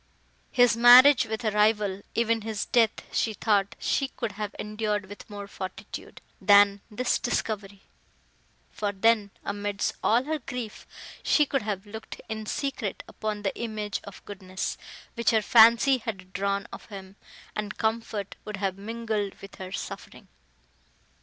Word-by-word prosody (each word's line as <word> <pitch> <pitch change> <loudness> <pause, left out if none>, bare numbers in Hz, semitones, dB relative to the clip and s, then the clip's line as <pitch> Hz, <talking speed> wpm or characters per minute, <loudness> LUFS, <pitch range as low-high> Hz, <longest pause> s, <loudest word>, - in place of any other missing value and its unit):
His 245 -3 +5
marriage 245 +2 +8
with 220 +2 -4
a 215 - +2
rival, 210 -2 +2
even 230 -1 +2
his 215 -1 -3
death, 230 -3 +2
she 220 -2 +1
thought 200 -2 +1
she 275 - 0
could 230 -4 -4
have 205 0 -5
endured 210 -1 -2
with 205 +3 -12
more 205 -1 -7
fortitude, 185 -1 -8 0.2
than 200 -1 +6
this 245 +3 0
discovery; 205 -4 -3 0.9
for 205 -1 -2
then, 210 +1 +2 0.2
amidst 205 0 -2
all 235 +3 +4
her 310 +2 -2
grief, 250 -4 -7 0.3
she 300 - +3
could 275 -1 -1
have 205 -2 -4
looked 220 +2 -9
in 220 -1 -5
secret 270 -7 -3
upon 210 -1 -4
the 195 - -1
image 215 -3 -4
of 200 -2 -12
goodness, 190 -2 -5 0.4
which 235 -2 +1
her 220 -1 +3
fancy 235 +4 +6
had 190 -5 -7
drawn 200 +1 -1
of - - -9
him, 195 -2 -10 0.4
and 210 -1 -4
comfort 220 -3 -2
would 210 -1 -6
have 195 -1 -2
mingled 220 -2 -3
with 195 - -11
her 185 -1 -7
suffering! - - -7
210 Hz, 145 wpm, -27 LUFS, 200-230 Hz, 0.9 s, marriage